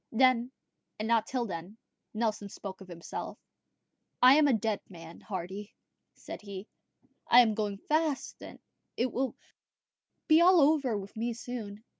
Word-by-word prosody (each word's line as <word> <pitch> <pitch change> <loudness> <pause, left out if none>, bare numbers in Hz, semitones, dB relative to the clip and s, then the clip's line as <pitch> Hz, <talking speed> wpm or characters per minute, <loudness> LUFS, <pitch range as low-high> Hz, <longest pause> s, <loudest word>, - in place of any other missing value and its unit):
Then, 250 +1 +3 0.5
and 215 - -3
not 230 -1 +2
till 250 -2 -1
then, 180 +2 -7 0.3
Nelson 215 -2 -2
spoke 195 -1 -8
of 190 - -11
himself. 170 -2 -7 0.8
"I 255 +1 +8
am 300 0 +5
a 275 - +4
dead 220 -1 0
man, 165 -2 -11
Hardy," 195 +1 -6 0.4
said - - -9
he; 200 0 -8 0.6
"I 245 - +8
am 225 -3 +2
going 205 -2 -2
fast; 310 -2 0 0.6
it 245 +1 0
will 260 +3 -2 0.9
be 315 +1 +6
all 360 0 +7
over 280 -6 +3
with 200 0 -8
me 235 +2 -2
soon." 225 -3 -7
220 Hz, 145 wpm, -30 LUFS, 200-255 Hz, 0.9 s, I